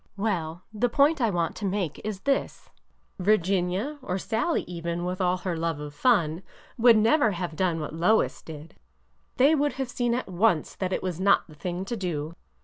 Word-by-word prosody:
'' - - -42
Well,— 170 -3 -2
the 240 +3 +1
point 285 +4 +3
I 230 - +3
want 170 -4 -1
to 210 - -4
make 190 -5 -2
is 205 -2 -4
this: 275 -1 -2 0.5
Virginia 195 - +1
— - - -32
or 190 -8 -3
Sallie, 225 - -1
even, 170 0 -4
with 180 +1 -3
all 180 0 +2
her 180 -1 -3
love 165 -2 -2
of 150 -1 -7
fun— 170 -4 +2 0.3
would 235 -2 +6
never 225 +1 +3
have 175 -2 -4
done 175 -2 0
what 155 - -5
Lois 180 +7 +2
did. 155 0 -10 0.6
They 275 +5 +5
would 290 -1 +1
have 265 -2 -4
seen 240 -1 0
at 255 - -3
once 185 -3 +1
that 185 -1 -2
it - - -2
was 180 -2 -3
not 200 +1 +4
the 155 - -14
thing 175 +5 -4
to 235 - -3
do. 165 -6 -3
185 Hz, 200 wpm, -26 LUFS, 170-230 Hz, 0.6 s, would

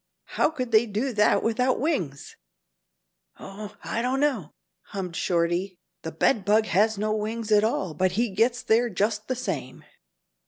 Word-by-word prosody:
How - - +3
could 255 -6 -5
they 220 +2 +4
do 225 +5 -2
that 210 -1 +3
without 250 +3 +1
wings?" 180 - -2 1.0
"Oh, 205 +1 -9
I 230 - -2
don't 255 +2 0
know," 260 - 0 0.4
hummed 185 -4 -6
Shorty: 175 +2 0 0.2
"The 160 - -5
bed 195 - +1
bug 215 +2 +3
has 215 +3 +2
no 215 +1 0
wings 220 +1 -3
at 210 0 +5
all 195 -6 -1
But 185 +2 0
he 230 +2 0
gets 235 +5 +1
there 235 +2 +3
just 210 +2 -1
the 255 - -1
same." 255 - -5
215 Hz, 160 wpm, -25 LUFS, 195-235 Hz, 1.0 s, at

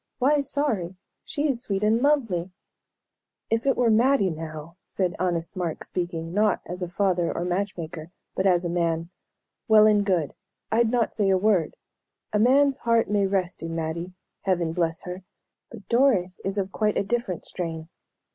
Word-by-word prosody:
Why 285 +4 +3
sorry? 265 -11 -1 0.3
She 295 +1 -1
is 255 -5 -1
sweet 200 -4 -2
and 220 +2 +3
lovely!" 230 - +1 1.0
"If 225 +4 +1
it 270 - +3
were 240 -2 +3
Mattie, 230 -3 +3
now," 160 +1 -8
said 185 -2 -1
honest 175 -1 -1
Mark, 175 -4 -3
speaking, 170 -2 -4
not 210 0 +2
as 180 +1 -7
a 180 - -3
father 180 -2 +1
or 175 - -3
match 190 +3 -2
maker, 160 -1 -7 0.2
but 190 - +1
as 180 -1 +3
a - - +1
man. 170 -1 -1 0.6
"Well 215 -2 +7
and 210 -1 +4
good. 180 -7 0 0.4
I'd 225 +1 +3
not 240 -1 +1
say 205 -3 +1
a 190 - +4
word. 190 -5 +1 0.6
A 210 - +2
man's 275 +4 +4
heart 230 -3 +2
may 200 -2 +2
rest 190 -2 -1
in 165 0 -4
Mattie 165 +2 -4 0.3
Heaven 175 -4 0
bless 165 -1 -1
her! 180 0 -7 0.5
But 210 -5 -12
Doris 230 -8 +2
is 195 +1 -3
of 195 -1 -1
quite 210 0 0
a - - +2
different 200 -4 -2
strain. 165 -3 -5
190 Hz, 175 wpm, -25 LUFS, 170-225 Hz, 1.0 s, Well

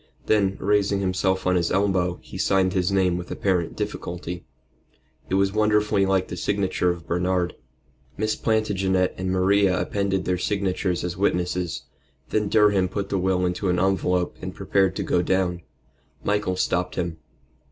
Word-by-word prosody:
Then, 100 -3 +2
raising 100 0 +2
himself 95 0 0
on 90 0 +3
his 85 -1 +1
elbow, 95 -2 +1
he - - -12
signed 95 -2 +2
his 90 0 +1
name 95 -2 +2
with 90 - -8
apparent 90 -4 -1
difficulty. 90 0 -5 0.8
It 95 - +1
was 95 0 +2
wonderfully 105 -2 +2
like 95 -1 +1
the 90 - -6
signature 95 -1 0
of 85 -2 -3
Bernard. 90 +1 0 0.6
Miss 110 0 0
Plantagenet 95 -4 +1
and 95 0 -3
Maria 95 0 +3
appended 100 -2 -1
their 90 -1 0
signatures 95 -2 -1
as 90 0 -3
witnesses. 90 -2 -1 0.5
Then 105 -2 0
Durham 105 -4 +4
put 100 +1 -3
the 95 - 0
will 90 0 +1
into 90 +2 -1
an 90 - +2
envelope 90 -1 +1
and - - -6
prepared 95 -1 +1
to - - -2
go 90 - +1
down. 90 -1 0 0.6
Michael 105 -2 0
stopped 90 0 -1
him. 85 -3 -3
95 Hz, 155 wpm, -24 LUFS, 90-100 Hz, 0.8 s, Durham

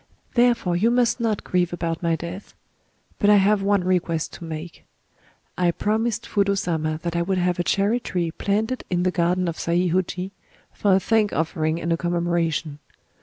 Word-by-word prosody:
Therefore 240 -7 +3
you 210 +7 +3
must 245 0 +2
not 225 -3 -1
grieve 180 -1 0
about 170 -2 -3
my 165 -1 +1
death... 170 +5 -8 0.6
But 205 - +3
I 210 - +7
have 205 +1 +4
one 200 -1 +2
request 175 -3 0
to - - -10
make. 160 +1 -7 0.8
I 180 -1 +3
promised 220 +5 -1
Fudō 200 -1 +1
Sama 160 -4 -1
that 170 -1 -3
I 170 - +1
would 185 +2 0
have 180 -1 0
a - - +2
cherry 205 +6 +1
tree 175 -8 -2
planted 220 +8 -1
in 180 -1 0
the 185 - +2
garden 180 +1 +1
of 165 - -3
Saihōji, 180 +2 0 0.4
for 200 -2 +3
a - - +4
thank 215 +1 +1
offering 160 0 -1
and 170 +1 0
a - - 0
commemoration. 170 -3 -1
180 Hz, 175 wpm, -23 LUFS, 170-205 Hz, 0.8 s, I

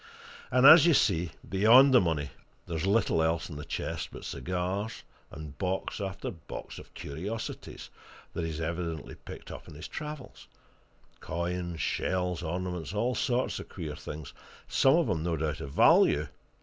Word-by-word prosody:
And 130 +1 +4
as 155 +2 +10
you 165 - +5
see, 85 -7 +2 0.2
beyond 120 +8 +6
the 125 - +7
money, 75 -6 -1 0.3
there's 85 0 -2
little 100 -5 +2
else 80 +1 0
in - - -7
the 75 - -6
chest - - -4
but - - -9
cigars, 90 - -3 0.3
and 75 -1 -9
box 95 +2 -2
after 95 0 -4
box 85 - -9
of - - -15
curiosities 100 +11 -6 0.4
that 85 - -3
he's 80 -1 -3
evidently 85 -1 -4
picked - - -10
up - - -9
in - - -11
his 75 - -7
travels 150 -3 -8 0.7
coins, 85 -1 -3
shells, 90 -1 -1
ornaments, 90 +2 -4
all 120 +4 +1
sorts 125 0 0
of - - -9
queer 80 -5 -6
things 75 -2 -8 0.3
some 135 +2 +4
of 170 -4 +2
'em 90 -7 0
no 85 0 -1
doubt 75 0 -2
of 70 - -6
value. 75 +1 +5
90 Hz, 160 wpm, -29 LUFS, 80-105 Hz, 0.7 s, as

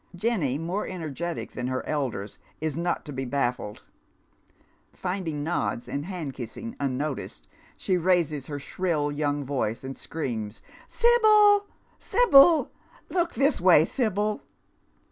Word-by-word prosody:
Jenny, 180 - 0
more 175 +6 -3
energetic 170 -1 -5
than 125 0 -4
her 130 0 -2
elders, 125 -9 -3 0.2
is 155 -2 -2
not 170 +1 -2
to 145 - -7
be 135 0 -3
baffled. 125 -5 -2 1.1
Finding 180 -6 -3
nods 160 -6 -2
and 145 +3 -4
hand 170 -8 -5
kissing 135 - -7
unnoticed, 135 - -3 0.3
she 185 - 0
raises 165 -6 +1
her 145 - -4
shrill 150 0 -1
young 145 0 -1
voice, 130 -4 -2
and 135 0 -6
screams, 115 -9 -5
" - - -22
Sibyl, 425 -3 +5 0.3
Sibyl 335 - +5 0.4
1 370 - -1
Look 340 0 0
this 275 - +2
way, 175 -4 +6
Sibyl." 210 -3 -1
160 Hz, 130 wpm, -26 LUFS, 135-200 Hz, 1.1 s, way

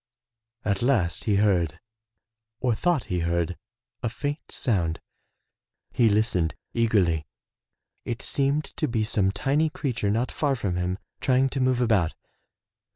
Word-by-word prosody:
At 100 -2 0
last 120 -10 +1
he 105 - +3
heard, 90 -6 +2 0.8
or 125 -2 +2
thought 160 +2 +1
he 90 -3 -2
heard, 85 +1 0 0.5
a 115 - 0
faint 145 +6 -4
sound. 85 -9 0 0.9
He 115 -2 +4
listened 100 -6 +1 0.2
eagerly. 95 -10 +2 0.8
It 120 -1 -4
seemed 140 +2 +1
to 155 - +1
be 115 -4 0
some 105 -3 +1
tiny 145 +9 +1
creature 130 - -2
not 115 +5 0
far 145 -3 +1
from 100 -7 -2
him, 90 +1 -1 0.2
trying 130 +1 +3
to 135 - -3
move 130 -1 +2
about. 105 -9 +2
110 Hz, 135 wpm, -26 LUFS, 90-130 Hz, 0.9 s, He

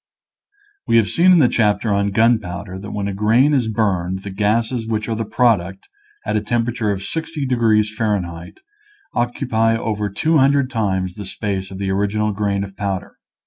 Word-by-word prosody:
We - - +4
have 110 -2 +3
seen 180 +2 +4
in 180 - +7
the 145 -6 +5
chapter 105 -2 +1
on 100 0 +1
gunpowder 100 -4 0
that 105 +2 -8
when 100 -1 -3
a 100 - -3
grain 115 +9 +3
is 130 -5 +2
burned 95 -4 -1
the 100 - -6
gases 110 +4 0
which 110 -1 -2
are 115 - -1
the 115 0 -3
product, 100 -6 +1 0.4
at - - -1
a 105 - +1
temperature 115 0 -1
of 100 -1 -2
60 160 0 -4
degrees 110 -4 +2
F., 90 -6 -2 0.6
occupy 115 -2 0
over 105 -2 -2
200 140 - +2
times 95 -6 -1
the 100 +2 -8
space 95 -1 -4
of 95 - -8
the 95 0 -2
original 105 +2 0
grain 100 -1 -1
of 100 -1 -9
powder. 100 -2 -4
105 Hz, 175 wpm, -19 LUFS, 100-115 Hz, 0.6 s, in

